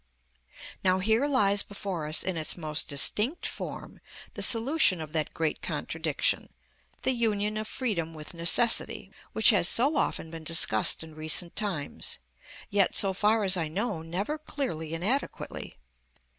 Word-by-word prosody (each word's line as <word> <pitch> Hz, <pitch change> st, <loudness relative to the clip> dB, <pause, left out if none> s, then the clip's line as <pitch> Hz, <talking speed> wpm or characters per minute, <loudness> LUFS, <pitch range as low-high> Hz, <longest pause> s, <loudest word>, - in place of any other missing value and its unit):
Now 185 Hz, 0 st, +3 dB
here 220 Hz, +8 st, +1 dB
lies 205 Hz, -8 st, +3 dB
before 190 Hz, -6 st, -6 dB
us 155 Hz, -, +3 dB
in 185 Hz, -, -2 dB
its 160 Hz, +1 st, -3 dB
most 155 Hz, -2 st, 0 dB
distinct 210 Hz, -, +2 dB
form -, -, -7 dB, 0.3 s
the -, -, -7 dB
solution 230 Hz, -, +5 dB
of 155 Hz, -2 st, -7 dB
that 155 Hz, -2 st, -1 dB
great 160 Hz, -2 st, -3 dB
contradiction, -, -, -2 dB, 0.5 s
the -, -, +3 dB
union 215 Hz, -4 st, -1 dB
of 215 Hz, 0 st, -4 dB
freedom 170 Hz, -12 st, -3 dB
with 155 Hz, +2 st, -9 dB
necessity, 195 Hz, +3 st, +2 dB, 0.2 s
which 220 Hz, -, +6 dB
has 185 Hz, -5 st, +4 dB
so 275 Hz, +6 st, +2 dB
often 160 Hz, -, -2 dB
been 165 Hz, -1 st, -9 dB
discussed 160 Hz, -6 st, +1 dB
in 160 Hz, -1 st, -12 dB
recent 155 Hz, +3 st, +1 dB
times, 190 Hz, -9 st, -3 dB, 0.5 s
yet, 200 Hz, -1 st, +2 dB
so 195 Hz, -1 st, +2 dB
far 210 Hz, +3 st, +1 dB
as 190 Hz, -1 st, +2 dB
I 165 Hz, -3 st, -2 dB
know, 195 Hz, +2 st, -3 dB
never 195 Hz, -, -4 dB
clearly 165 Hz, -, -4 dB
and 170 Hz, +2 st, -4 dB
adequately. 265 Hz, +6 st, -3 dB
190 Hz, 150 wpm, -27 LUFS, 160-220 Hz, 0.5 s, which